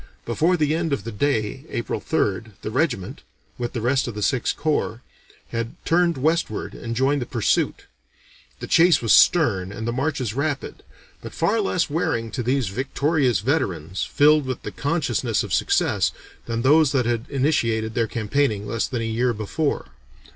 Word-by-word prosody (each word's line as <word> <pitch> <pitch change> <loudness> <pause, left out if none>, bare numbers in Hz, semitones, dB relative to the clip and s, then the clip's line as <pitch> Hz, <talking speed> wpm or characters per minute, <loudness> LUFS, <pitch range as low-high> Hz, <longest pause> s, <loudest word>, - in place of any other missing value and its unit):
Before 165 +10 +2
the 150 -1 +1
end 165 -2 -1
of 140 - -2
the 115 - -5
day 115 +1 -1
(April 120 - -3
3rd) 105 +2 -1
the 110 - -4
regiment, 125 - -1 0.4
with 120 -1 -3
the 120 - -3
rest 130 +3 +1
of 120 - -5
the 105 - -3
Sixth 130 +2 0
Corps, 145 -5 -1 0.5
had 115 0 -4
turned 170 -1 +2
westward 155 -5 -1
and 115 0 -5
joined 135 +3 +1
the 120 - -4
pursuit. 115 -4 0 0.8
The - - -3
chase 170 -1 +5
was 115 - +4
stern 100 - +4
and 110 +2 -5
the - - 0
marches 135 -4 -1
rapid, 140 +1 -3 0.4
but - - -9
far 205 +7 +1
less 180 -4 0
wearing 115 -7 -1
to 130 - -3
these 125 -2 0
victorious 130 - 0
veterans, 95 - -1
filled 150 -1 +3
with 130 -2 -4
the - - -5
consciousness 135 -7 -1
of - - -5
success, - - +2 0.4
than 115 0 -2
those 150 +1 +5
that 130 -3 +2
had 120 0 -1
initiated 115 -6 0
their 115 -1 +1
campaigning 110 -2 0
less 115 +1 -1
than 120 -3 -3
a - - -2
year 120 +2 0
before. 115 +8 -2
125 Hz, 170 wpm, -23 LUFS, 115-150 Hz, 0.8 s, chase